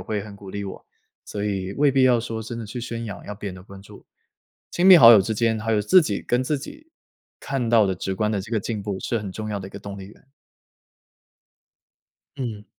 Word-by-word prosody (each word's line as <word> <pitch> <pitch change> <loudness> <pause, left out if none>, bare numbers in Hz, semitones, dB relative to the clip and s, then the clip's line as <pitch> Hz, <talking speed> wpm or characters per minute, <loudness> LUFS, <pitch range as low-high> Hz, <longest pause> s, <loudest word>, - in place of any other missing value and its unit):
会 105 -2 -3
很 105 -1 -10
鼓 100 -1 -13
励 100 +1 -5
我， 95 - -9 0.4
所 105 0 -4
以 95 -2 -3
未 145 0 +3
必 135 -1 +3
要 125 -2 +4
说， 115 -1 -5
真 115 +2 -7
的 115 - -6
去 120 +3 -6
宣 115 0 -5
扬， 100 - -7
要 105 - -6
别 100 0 -6
人 90 - -7
的 90 - -12
关 95 0 -13
注。 - - -15 0.6
亲 180 +2 +1
密 185 -2 +10
好 115 -5 +10
友 105 - +7
之 110 +3 -2
间， 110 0 0
还 115 +1 -1
有 105 -1 +2
自 185 - +6
己 105 - -2
跟 125 +1 0
自 145 +2 -1
己， 305 - -12 0.5
看 130 -4 -2
到 110 -3 +4
的 95 - -1
直 95 +2 -4
观 105 +2 -1
的 100 -3 -1
这 110 - -10
个 115 - +1
进 105 0 -4
步， 100 -2 -4
是 115 - -2
很 100 -2 -6
重 110 +2 -6
要 105 - -2
的 95 0 -8
一 - - -17
个 - - -9
动 100 0 -8
力 95 - -9
源。 110 +6 -19 2.1
嗯。 110 -6 -5
110 Hz, 265 characters per minute, -23 LUFS, 100-120 Hz, 2.1 s, 密